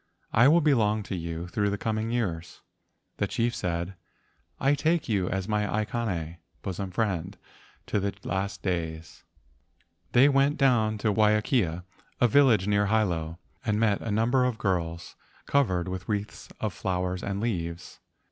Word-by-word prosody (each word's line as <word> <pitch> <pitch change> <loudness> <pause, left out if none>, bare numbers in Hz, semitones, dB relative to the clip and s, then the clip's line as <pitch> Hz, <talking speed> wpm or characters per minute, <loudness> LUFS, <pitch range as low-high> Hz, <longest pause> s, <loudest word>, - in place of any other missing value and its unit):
I 120 +3 +6
will 165 +4 +5
belong 110 -8 +2
to 95 - -5
you 85 0 -4
through 100 +3 0
the 100 - -2
coming 110 +1 -2
years." 90 -8 -3 0.6
The - - 0
chief 120 +1 0
said, 85 -1 -3 0.7
"I 140 +1 +3
take 160 +3 +1
you 100 -6 0
as 95 0 -2
my 105 -1 0
aikane 105 -7 -2 0.3
[bosom 95 +1 -4
friend] 95 -2 -2 0.5
to - - 0
the 100 0 -1
last 100 +1 -3
days." 80 -3 -4 0.9
They 130 +3 +7
went 140 +1 +3
down 115 -6 +3
to 105 0 0
Waiakea, 105 - +2 0.4
a 125 - +5
village 120 -6 +4
near 105 0 +2
Hilo, 85 -7 0 0.3
and 110 -4 0
met 110 -3 +2
a 115 - -4
number 115 +5 +2
of 125 -3 0
girls 85 -5 -2 0.3
covered 95 -11 +1
with 90 +1 -5
wreaths 105 0 -3
of 110 -4 -2
flowers 90 0 -2
and 100 0 -3
leaves. 85 -7 -4
105 Hz, 150 wpm, -27 LUFS, 90-115 Hz, 0.9 s, They